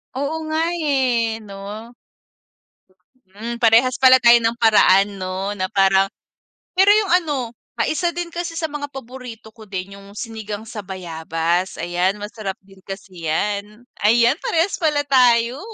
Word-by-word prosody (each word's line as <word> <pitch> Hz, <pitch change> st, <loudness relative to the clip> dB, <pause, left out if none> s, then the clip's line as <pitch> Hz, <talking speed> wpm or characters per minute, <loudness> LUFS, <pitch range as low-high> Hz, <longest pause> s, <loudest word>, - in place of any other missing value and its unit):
Oo 280 Hz, +4 st, -2 dB
nga, 315 Hz, +1 st, 0 dB
eh, 255 Hz, -8 st, 0 dB
'no? 205 Hz, +3 st, -9 dB, 1.4 s
Hmm, 235 Hz, +3 st, -5 dB
parehas 235 Hz, +2 st, +4 dB
pala 260 Hz, -1 st, +7 dB
tayo 235 Hz, 0 st, +8 dB
ng 230 Hz, 0 st, 0 dB
paraan 200 Hz, -3 st, +4 dB
'no 185 Hz, +2 st, -3 dB
na 185 Hz, -1 st, -1 dB
parang 195 Hz, -1 st, +3 dB, 0.7 s
pero 380 Hz, +2 st, +4 dB
yung 425 Hz, -4 st, +1 dB
ano, 270 Hz, -7 st, -3 dB, 0.3 s
ah, -, -, +3 dB
isa 345 Hz, +2 st, 0 dB
din 345 Hz, -1 st, -4 dB
kasi 345 Hz, -1 st, -5 dB
sa 325 Hz, -1 st, -2 dB
mga 290 Hz, -1 st, -4 dB
paborito 250 Hz, -4 st, -10 dB
ko 220 Hz, 0 st, -15 dB
din 195 Hz, 0 st, -6 dB
yung 200 Hz, 0 st, -15 dB
sinigang 220 Hz, -3 st, -6 dB
sa 220 Hz, -1 st, -7 dB
bayabas, 170 Hz, -1 st, -2 dB
ayan 175 Hz, +3 st, 0 dB
masarap 210 Hz, -2 st, -5 dB
din 195 Hz, 0 st, -19 dB
kasi 190 Hz, -4 st, -8 dB
yan. 205 Hz, +6 st, -2 dB, 0.2 s
Ayan 235 Hz, +5 st, +4 dB
parehas 335 Hz, +4 st, 0 dB
pala 300 Hz, -4 st, +1 dB
tayo. 245 Hz, -1 st, +3 dB
225 Hz, 145 wpm, -20 LUFS, 195-265 Hz, 1.4 s, tayo